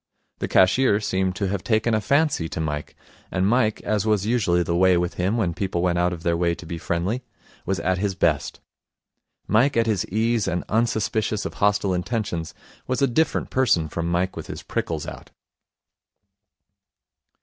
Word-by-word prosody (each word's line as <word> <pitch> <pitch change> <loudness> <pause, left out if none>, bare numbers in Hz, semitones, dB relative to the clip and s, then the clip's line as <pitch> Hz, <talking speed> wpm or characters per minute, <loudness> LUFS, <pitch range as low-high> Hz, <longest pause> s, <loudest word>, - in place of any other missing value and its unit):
The - - -2
cashier 100 +3 +4
seemed 95 -3 -1
to 100 -2 -1
have 100 -2 -3
taken 110 0 +1
a 110 - +2
fancy 140 - +1
to - - -5
Mike; 75 -2 -3 0.3
and 95 0 0
Mike, 110 0 +2
as 105 -1 0
was 105 -2 +1
usually 100 -7 +2
the 85 0 -1
way 90 0 +4
with 85 0 -1
him 95 +6 0
when 90 -7 0
people 90 -1 -2
went 90 -1 +1
out 90 0 +2
of 85 -2 -6
their 85 -1 +1
way 85 0 +1
to 90 - -11
be 85 0 -5
friendly, 90 +10 -1 0.5
was 95 0 0
at 95 0 0
his 100 -1 -1
best. 80 -6 0 0.9
Mike 120 +5 +3
at 115 - +3
his 105 -5 +1
ease 110 +2 0
and 85 +1 -1
unsuspicious 110 -1 0
of - - -4
hostile 100 -1 +1
intentions 90 -3 -3 0.3
was 130 +2 0
a - - +5
different 155 +6 0
person 105 -12 +2
from 85 +2 -3
Mike 90 +2 0
with - - -7
his - - -7
prickles - - -3
out. - - -9
95 Hz, 180 wpm, -23 LUFS, 85-110 Hz, 0.9 s, a